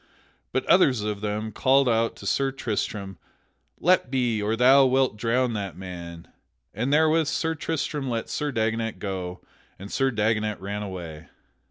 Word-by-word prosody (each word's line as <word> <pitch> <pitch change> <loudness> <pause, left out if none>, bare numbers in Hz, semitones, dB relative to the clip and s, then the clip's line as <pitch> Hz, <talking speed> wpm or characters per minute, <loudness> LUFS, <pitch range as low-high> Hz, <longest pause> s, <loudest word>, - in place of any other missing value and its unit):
But - - -1
others 125 -5 +4
of 105 -1 -3
them 105 +1 -3
called 135 +4 +3
out 115 -1 +1
to - - -12
Sir 135 -1 +1
Tristram, 105 -5 -4 0.6
"Let 180 -6 +3
be, 120 -5 0
or 105 +2 0
thou 130 +4 +6
wilt 130 -3 +2
drown 120 +3 0
that 100 -4 -4
man"; 85 -3 -8 0.5
and 125 +6 -1
therewith 155 +1 +3
Sir 160 +1 0
Tristram 150 -3 -3
let 115 -2 -2
Sir 150 -1 -2
Dagonet 115 -1 -1
go, 95 -3 -5 0.4
and 100 +2 -10
Sir 135 0 +1
Dagonet 110 -2 0
ran 100 +2 -4
away. 85 -6 -7
115 Hz, 155 wpm, -25 LUFS, 100-135 Hz, 0.6 s, thou